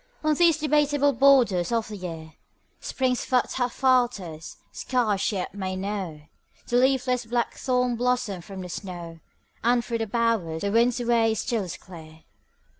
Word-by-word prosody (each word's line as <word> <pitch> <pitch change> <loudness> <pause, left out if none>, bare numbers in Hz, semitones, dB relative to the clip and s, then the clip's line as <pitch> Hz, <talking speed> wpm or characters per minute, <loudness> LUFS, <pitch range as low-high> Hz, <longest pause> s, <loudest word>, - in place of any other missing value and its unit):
On 310 0 +3
these 335 +1 +4
debateable* 290 -2 +2
borders 240 -8 +4
of 230 -2 0
the 215 - -6
year 165 -4 -7 0.5
Spring's 255 -2 -1
foot 250 -2 +1
half 245 -1 -1
falters; 235 - 0
scarce 220 - 0
she 205 - 0
yet 185 - -4
may 190 -2 -4
know 190 -5 -4 0.4
The 240 - +1
leafless 250 -2 +2
blackthorn 245 +1 0
blossom 245 -6 -1
from 190 +1 -9
the 180 - -7
snow; 175 -3 -7 0.4
And 240 +1 +2
through 230 -1 -2
her 225 - -2
bowers 215 -8 0
the 200 - 0
wind's 235 +3 +3
way 230 -2 +2
still 220 -1 -1
is 175 - -6
clear. 160 -3 -13
230 Hz, 155 wpm, -25 LUFS, 185-250 Hz, 0.5 s, these